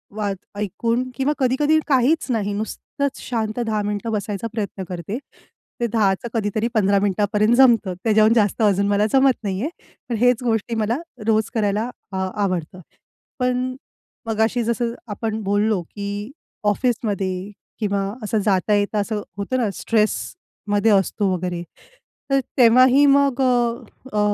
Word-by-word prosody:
वाच 205 -2 -1 0.2
ऐकून 230 +5 -1
किंवा 270 +3 +1
कधी-कधी 290 +5 +3
काहीच 280 +4 +3
नाही, 205 -3 -1
नुसतंच 260 +6 -4
शांत 225 -1 -2
10 215 -1 0
मिनिटं 205 +2 -3
बसायचा 210 0 -3
प्रयत्न 205 -3 -4
करते. 180 +5 -4 0.6
ते 235 - +1
10 210 -4 +2
चं - - -3
कधीतरी 220 0 0
15 200 -2 +3
मिनिटापर्यं 205 +3 +2
जमतं 235 -7 +5
त्याहून 220 0 +5
जास्त 215 -2 +2
अजून 200 -2 +3
मला 205 +1 +2
जमत 270 0 +5
नाही 195 -1 -2
आहे. 290 - -1 0.4
पण 235 - 0
हेच 245 +1 +3
गोष्टी 230 -1 0
मला 225 +2 0 0.3
रोज 220 -1 +2
करायला 215 +1 0 0.2
आ 190 0 -1 0.2
आवडतं. 180 -1 -3 0.6
पण 250 0 0 0.5
मगाशी 225 +2 +1
जसं 235 +1 -1
आपण 220 +1 -3
बोललो, 205 -1 +1
की 205 +5 -6 0.3
ऑफिसमध्ये 205 -4 -1 0.3
किंवा 200 -2 0 0.2
असं 215 +1 0
जाता-येता 205 +2 +2
असं 210 0 -2 0.2
होतं 205 +6 -2
ना 230 -4 +1
स्ट्रेसमध्ये 215 - -1
असतो 195 0 +2
वगैरे 180 -1 -3 0.7
तर 275 - +4 0.2
तेव्हाही 255 +3 +6
मग 280 -2 +3
अ, 240 -2 +1 0.3
अ, 210 - +1
215 Hz, 140 wpm, -21 LUFS, 205-240 Hz, 0.7 s, तेव्हाही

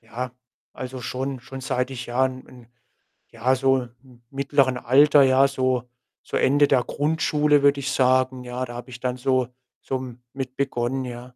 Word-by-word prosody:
ja, 120 +2 -6 0.4
also, 130 0 -7
schon 130 +1 -4
schon 135 +1 -9
seit 125 0 -2
ich 125 -1 -6
ja, 125 +2 +1
'n 130 0 -4
'n 125 -2 -16 0.6
ja, 120 +3 +1
so 135 0 +3 0.2
m 125 -3 -20
mittleren 135 -2 +1
Alter, 140 +4 +5
ja, 135 +1 +5
so, 130 -2 -1 0.3
so - - -5
Ende 145 +2 +4
der 130 -3 +3
Grundschule, 150 -1 +1
würde 140 0 +4
ich 135 -1 -2
sagen, 130 0 +2
ja. 125 +1 -4
Da 120 -1 -8
habe 120 +1 -8
ich 125 - -10
dann 125 -1 -2
so 130 -1 +1 0.3
so 130 - -3
m 125 -2 -8
mit 130 -1 -6
begonnen, 130 -1 -1
ja. 120 -1 -7
130 Hz, 180 wpm, -23 LUFS, 125-135 Hz, 0.6 s, Alter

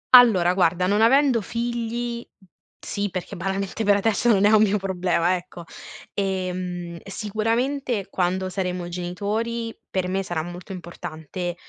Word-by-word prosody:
Allora, 195 -8 +7
guarda, 180 -1 +2
non 205 +3 +2
avendo 260 0 +5
figli 235 +2 -3 0.6
sì 205 0 -3
perché 185 -1 -5
banalmente 195 +4 -2
per 205 -1 +5
adesso 220 +3 +2
non 205 -3 +5
è 210 - +6
un 215 -1 +6
mio 210 -1 +3
problema, 185 -2 +1
ecco; 175 0 -10 0.5
ehm, 180 -3 -3
sicuramente 225 +3 -1
quando 185 +1 0
saremo 180 -2 -2
genitori 210 +6 -3
per 185 -1 -1
me 190 +1 0
sarà 175 -4 -2
molto 175 +3 -8
importante 175 -1 -6
195 Hz, 135 wpm, -24 LUFS, 180-225 Hz, 0.6 s, Allora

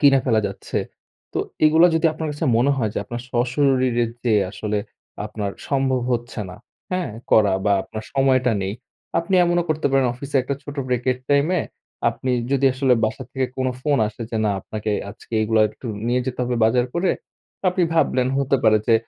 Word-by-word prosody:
কিনে 140 -2 +6
ফেলা 115 -3 +3
যাচ্ছে। 100 - -4 0.5
তো - - -1 0.3
এগুলো 160 +3 +6
যদি 165 +1 +3
আপনার 160 0 -4
কাছে 145 +2 -2
মনে 125 +4 +3
হয় 110 -5 0
যে - - 0
আপনার 120 -1 -5
স্বশরীরে 125 -1 +2 0.2
যেয়ে 110 -4 +3
আসলে 105 +2 -2 0.5
আপনার 105 -1 -4 0.2
সম্ভব 135 -2 +1
হচ্ছে 120 -1 -3
না। 90 - -10 0.4
হ্যাঁ? 180 -7 -1 0.2
করা 105 -3 +5
বা 105 - +3
আপনার 110 +2 -8
সময়টা 130 -2 +3
নেই। 95 +1 -2 0.4
আপনি 170 +3 -1
এমনও 175 0 +2
করতে 155 0 0
পারেন, 135 -1 +3
অফিসে 140 +3 -3
১ 125 - -7
টা - - +2
ছোট 145 0 -8
Break 125 -1 -1
এর 125 - -9
টাইমে 150 +5 +3 0.5
আপনি 130 - -4 0.2
যদি 135 0 +3
আসলে 130 -1 +3
বাসা 110 +4 -2
থেকে 130 -1 0
কোনো 130 0 0
ফোন 145 0 +2
আসে 110 +2 -8
যে 115 - -2
না, 105 - +2
আপনাকে 105 +2 -4 0.2
আজকে 110 - -16
এগুলা 110 0 +2
একটু 125 - -11 0.2
নিয়ে 125 +1 +2
যেতে 130 - -4
হবে 125 0 -1
বাজার 120 +2 +3
করে। 175 +1 +2 0.6
আপনি 180 0 +1
ভাবলেন 130 -5 +2
হতে 135 0 +2
পারে 110 -1 +6
যে 115 - +6
130 Hz, 190 wpm, -22 LUFS, 115-140 Hz, 0.6 s, কিনে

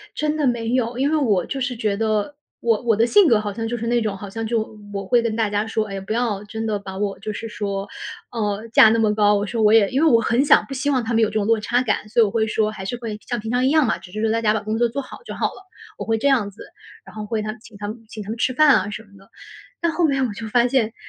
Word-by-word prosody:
真 305 0 -1
的 295 - +1
没 230 -2 -1
有。 245 -1 0
因 275 +2 +1
为 315 - +2
我 210 - +1
就 275 - -4
是 255 -1 -2
觉 210 -3 -1
得 220 +5 -1 0.2
我 230 -2 +1
我 225 -3 +3
的 225 +2 +3
性 400 +6 +5
格 225 -3 +4
好 205 -1 -3
像 225 +2 -4
就 240 +1 -3
是 230 +1 -4
那 240 0 +2
种 210 -3 -2
好 200 0 -8
像 225 +2 -4
就 220 -1 -2 0.2
我 195 -1 -4
会 235 +4 +3
跟 225 -2 -2
大 220 -2 +1
家 205 +1 0
说， 220 -1 -1
哎 195 - -6
呀， 195 - -5
不 215 - -2
要 225 -4 -1
真 220 +2 -5
的 215 -2 0
把 190 -1 -8
我 200 -1 -2
就 215 +1 -5
是 225 +2 -6
说， 200 -1 -4 0.4
呃， 215 -1 -2
架 220 - +8
那 225 +1 +2
么 215 -1 +2
高， 210 -1 +3
我 205 0 0
说 225 +2 -2
我 215 0 +5
也 215 -3 +5
因 270 +4 0
为 - - +6
我 230 -1 +5
很 235 +5 +2
想 - - +6
不 275 - -8
希 275 +2 -1
望 260 -4 +1
他 230 +1 -3
们 225 - +3
有 215 - +2
这 - - -12
种 210 -2 0
落 225 -1 +3
差 240 +4 +1
感， 210 -3 -1
所 230 - +3
以 - - +6
我 - - -1
会 220 -1 +1
说 215 0 +1
还 190 -3 -8
是 245 - -3
会 225 -3 -5
像 240 -2 -2
平 220 +2 -5
常 250 +1 +1
一 - - +3
样 310 -2 +4
嘛， - - 0
只 180 - -14
是 215 - -4
说 220 0 +1
大 230 0 0
家 215 -1 +3
把 220 - 0
工 215 +2 -2
作 240 0 +3
做 275 +5 -4
好 - - -11
就 - - -6
好 - - 0
了。 380 - -11 0.3
我 - - -5
会 225 -1 +1
这 280 - 0
样 240 -7 +2
子， - - -12 0.4
然 - - -14
后 215 -1 -5
会 215 0 -2
他 215 0 -4
请 230 -3 -16
他 205 0 -5
们 225 +1 -8
请 215 -1 -8
他 205 - -10
们 225 - -4
吃 255 +2 0
饭 305 +2 +5
啊， 205 0 0
什 210 +1 -7
么 205 - -23
的。 195 0 -20 0.5
但 340 -1 +1
后 335 -1 +2
来 275 -1 0
我 250 -5 0
就 220 +2 -7
发 240 +2 +3
现， 240 -3 +1
225 Hz, 345 characters per minute, -22 LUFS, 210-240 Hz, 0.5 s, 架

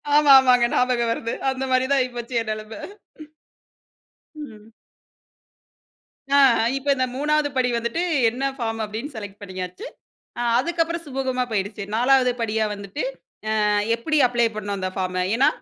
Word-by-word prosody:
ஆமா, 295 -2 +6
ஆமாங்க. 250 -2 +4
ஞாபகம் 245 -2 +1
வருது. 230 0 -3 0.2
அந்த 265 0 -4
மாதிரி 255 0 +3
தான் 275 - +4
ஆயிப்போச்சு 245 -1 -4
என் 220 - -6
நெலமை. 215 +1 -7 1.6
ம். 225 -7 -11 1.6
ஆ, 280 - +5 0.4
இப்ப 275 +1 -9
இந்த 255 -1 +1
3வது 300 +1 +1
படி 250 -1 +2
வந்துட்டு 235 +9 -2 0.3
என்ன 250 +4 -6
ஃபார்ம் 225 -2 -3
அப்பிடின்னு 225 +7 -6
செலக்ட் 205 -1 -9
பண்ணியாச்சு. 185 -1 -7 0.5
அ - - -3 0.2
அதுக்கு 335 +5 -2
அப்புறம் 335 +1 -3
சுமூகமா 260 -2 -2
போயிடுச்சு. 205 0 -3
4வது 250 +1 +3
படியா 220 -1 0
வந்துட்டு, 200 +8 -6 0.6
அ 210 - +2 0.3
எப்பிடி 305 +7 -1
அப்ளை 240 -1 +1
பண்ணனும் 205 -1 -3
அந்த 185 0 -2
ஃபார்ம? 185 -1 -1
ஏன்னா, 265 +4 +4
240 Hz, 140 wpm, -23 LUFS, 215-270 Hz, 1.6 s, ஆமா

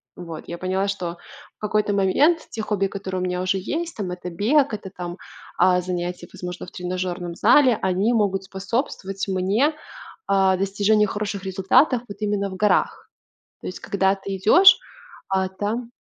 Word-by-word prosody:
Вот. 165 -3 -8
Я 170 - -5
поняла, 190 +2 -1
что 175 -4 -3 0.4
в - - -70
какой-то 210 -1 0
момент 280 - +2
те 220 - -5
хобби, 195 -2 0
которые 190 -2 -5
у - - -1
меня 180 0 -2
уже 185 +1 0
есть, 330 - -4
там 200 -5 -4
это 180 0 -6
бег, 250 - +2
это, 200 -2 -5
там, 180 -1 -7 0.4
а, 180 -1 +5
занятия, 175 -1 -4
возможно, 180 0 -6
в - - -13
тренажерном 180 -1 -4
зале, 245 +1 +5
они 190 +6 +2
могут 195 -3 +1
способствовать 195 0 -4
мне, 200 +11 +1 0.5
а, 190 -1 +3
достижению 205 +2 +2
хороших 205 -1 -4
результатов 195 +7 +3
вот 200 0 -9
именно 205 -2 -1
в 185 - -7
горах. 210 +2 +1 0.5
То - - -8
есть 185 - -7
когда 195 0 +1
ты 195 0 -5
идешь, 350 - +7 0.5
а 190 -1 0
там 220 +5 -3
195 Hz, 165 wpm, -23 LUFS, 185-210 Hz, 0.5 s, идешь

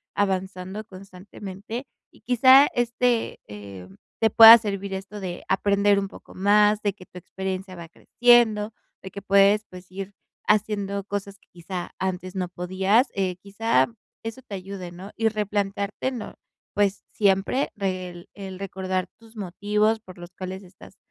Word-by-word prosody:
avanzando 190 +1 -2
constantemente 195 +4 -9 0.3
y, - - -22
quizá, 260 +3 +6
este, 240 0 0
em, 100 -2 -11 0.2
te 225 - +3
pueda 225 +2 +11
servir 200 -3 -4
esto 195 +2 -6
de 180 -2 -6
aprender 200 +1 +3
un 195 - -3
poco - - -14
más, 210 +2 +3
de 205 -2 0
que 185 -3 -15
tu 180 - -14
experiencia 190 +1 -5
va 170 -2 -10
creciendo, 225 0 +3 0.3
de 190 - -8
que 200 - -8
puedes, 200 +2 +4
pues, 180 0 -13
ir 195 +1 -7 0.3
haciendo 205 -2 0
cosas 200 0 -5
que, - - -32
quizá, 175 +1 -6
antes 185 -1 -3
no 185 -2 -2
podías, 190 +7 +1
eh, 185 -2 -1
quizá, 200 +5 +1 0.4
eso 225 +4 -6
te 210 -6 -8
ayude, 185 -2 -7
¿no? 185 +4 -10
Y 225 0 +1
replantearte, 205 +1 -2
¿no?, 240 -4 -7 0.4
pues, 205 -1 0
siempre 200 +6 +1
re 185 -3 -3
el 175 0 -13
el 190 -2 -8
recordar 185 -1 -3
tus 225 0 -19
motivos, 210 +3 0
por 185 -4 -14
los 175 +1 -11
cuales 190 +1 -6
estás, 185 0 -16
195 Hz, 155 wpm, -24 LUFS, 185-210 Hz, 0.4 s, pueda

